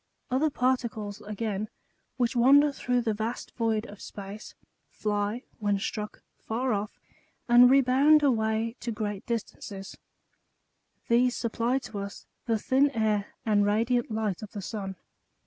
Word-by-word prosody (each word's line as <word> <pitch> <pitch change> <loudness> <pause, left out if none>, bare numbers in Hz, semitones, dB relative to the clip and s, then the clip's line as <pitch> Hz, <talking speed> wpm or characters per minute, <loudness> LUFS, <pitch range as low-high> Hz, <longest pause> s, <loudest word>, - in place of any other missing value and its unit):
Other 280 +5 +2
particles 235 -6 -1
again, 210 0 -3 0.5
which 245 0 +1
wander 280 +5 +6
through 250 -2 0
the 225 -2 0
vast 220 +3 -4
void 225 -2 0
of 205 -3 -11
space, 200 +2 -9 0.3
fly, 210 +2 -2 0.2
when 205 -2 +1
struck, 210 +2 -5 0.2
far 245 +2 -1
off, 205 +1 -3 0.5
and 245 +1 +8
rebound 275 +3 +5
away 225 -3 +1
to 235 - -3
great 210 -2 -3
distances; 210 -4 -5 1.1
these 245 +1 +3
supply 235 +2 0
to 220 -6 -6
us 200 0 -7 0.2
the 225 -1 +2
thin 265 +6 +3
air 215 -2 +1 0.2
and 210 -2 +3
radiant 230 +4 +1
light 215 -4 -2
of 215 - -9
the 205 - -5
sun. 195 -3 -5
225 Hz, 135 wpm, -28 LUFS, 210-245 Hz, 1.1 s, and